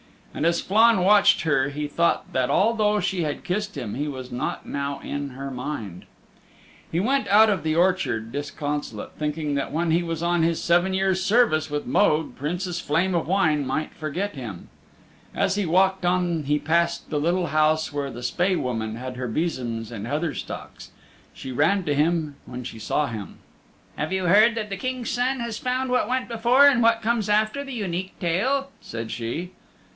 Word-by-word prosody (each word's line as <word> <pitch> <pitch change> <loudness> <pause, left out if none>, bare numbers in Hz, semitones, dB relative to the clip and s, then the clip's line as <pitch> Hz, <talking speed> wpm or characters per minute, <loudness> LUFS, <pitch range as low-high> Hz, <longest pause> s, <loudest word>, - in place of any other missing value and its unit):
And 155 - -2
as 170 0 +2
Flann 220 0 +4
watched 205 +2 +5
her 145 -4 +1
he 150 +1 -4
thought 170 +4 0
that 130 -1 +1
although 210 0 +2
she 190 -3 -1
had 150 -2 -3
kissed 200 -1 -3
him 120 -6 -4
he 145 +3 -2
was 130 -3 -6
not 120 +1 -3
now 140 0 -3
in 145 -1 -4
her 135 +2 -6
mind. 125 - -6 0.9
He 165 - 0
went 270 +8 +1
out 215 +2 +6
of 200 -4 +1
the 155 0 0
orchard 170 -11 +1
disconsolate, 145 -4 -4
thinking 150 0 -2
that 140 - -2
when 165 +1 0
he 170 +2 +3
was 165 -1 -3
on 175 0 +2
his 165 0 +1
seven 175 +2 +2
years' 190 -1 +1
service 200 -8 +3
with 145 0 -3
Mogue 150 +2 +2
Princess 175 +5 -3
Flame 180 +3 0
of 170 -3 0
Wine 155 -7 +2
might 155 +4 -2
forget 175 +7 -3
him. 115 - -8 0.7
As 195 -1 +1
he 205 -1 0
walked 190 +2 +3
on 175 -3 +1
he 150 +1 +2
passed 170 +3 0
the 150 - 0
little 175 +3 +1
house 155 +1 +2
where 140 -1 -2
the 120 -1 -8
Spae 180 +9 +1
Woman 115 -7 -2
had 125 +1 -6
her 125 -1 -3
besoms 120 -5 -2
and 110 -1 -6
heather 150 +3 -1
stalks. - - -8 0.4
She 130 - -8
ran 195 +10 +2
to 150 - 0
him 155 0 0
when 125 0 -6
she 115 - -8
saw 145 +7 0
him. 110 -5 -7 0.6
"Have 155 +3 -2
you 190 -1 -1
heard 215 +6 +5
that 215 -2 -3
the 195 - -3
King's 255 +3 -3
Son 250 +1 0
has 230 -2 -4
found 255 0 -1
what 250 0 +1
went 255 0 -1
before, 240 +4 +4
and 265 -4 +4
what 230 0 +3
comes 220 -2 0
after 215 +6 +1
the 275 -1 -7
Unique 190 -4 -4
Tale?" 260 +11 0
said 115 -1 -6
she. 140 +10 -4
170 Hz, 190 wpm, -24 LUFS, 145-200 Hz, 0.9 s, out